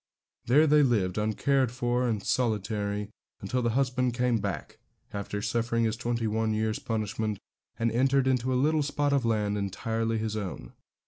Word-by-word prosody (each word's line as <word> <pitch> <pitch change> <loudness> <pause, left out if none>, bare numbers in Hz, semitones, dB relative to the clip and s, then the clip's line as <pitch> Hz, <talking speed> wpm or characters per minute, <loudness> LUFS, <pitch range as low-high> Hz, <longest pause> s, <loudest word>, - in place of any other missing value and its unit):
There 145 +6 +6
they 150 0 +5
lived, 105 -9 +1
uncared 125 +4 +1
for 125 0 0
and 110 -4 -1
solitary, 105 -3 -1 0.3
until 125 +6 -2
the 120 - +1
husband 125 -2 +1
came 125 -2 +1
back, 100 -7 -5 0.3
after 100 0 -4
suffering 115 +1 0
his 110 -1 +1
twenty 115 0 -2
one 110 0 0
years' 110 0 -1
punishment, 110 -1 -2 0.4
and 115 0 +1
entered 135 +3 +3
into 130 -1 +1
a - - +1
little 150 +4 +2
spot 145 0 0
of 135 -4 +2
land 105 -2 0
entirely 115 +3 -1
his 110 -1 -2
own. 100 -4 -5
115 Hz, 165 wpm, -28 LUFS, 105-125 Hz, 0.4 s, There